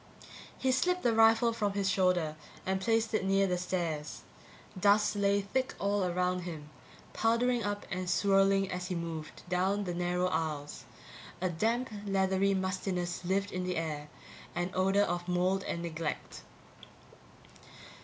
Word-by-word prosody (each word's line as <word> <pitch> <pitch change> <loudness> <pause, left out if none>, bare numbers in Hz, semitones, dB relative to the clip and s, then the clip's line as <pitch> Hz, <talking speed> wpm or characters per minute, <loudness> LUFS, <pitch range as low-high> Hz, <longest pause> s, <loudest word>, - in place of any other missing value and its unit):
He 260 - +1
slipped 360 +8 +1
the 235 - +3
rifle 225 +1 +5
from 210 -3 -1
his 200 -1 0
shoulder 180 -5 +2 0.3
and 190 0 0
placed 225 +2 +1
it 215 - +1
near 195 +1 +3
the 180 -2 +1
stairs. 170 -5 -3 0.5
Dust 205 +2 +3
lay 200 0 +2
thick 255 +7 -2
all 200 0 0
around 180 0 0
him, 160 -4 -7 0.4
powdering 235 +1 +2
up 205 0 -3
and 185 0 -2
swirling, 195 +1 +3
as 180 0 -3
he 180 - -3
moved 165 -2 -6
down 190 +3 +1
the 180 -2 -3
narrow 180 +1 0
aisles; 155 -3 -3 0.5
a 185 0 0
damp, 230 +8 0 0.2
leathery 195 0 +2
mustiness 185 -2 -2
lived 195 +2 0
in 185 0 -3
the 180 0 -2
air, 150 -2 -3 0.5
an 175 +1 -1
odor 195 +2 +3
of 175 -1 -2
mold 180 +2 +1
and 170 - -3
neglect. 165 -2 -4
190 Hz, 145 wpm, -31 LUFS, 175-200 Hz, 0.5 s, rifle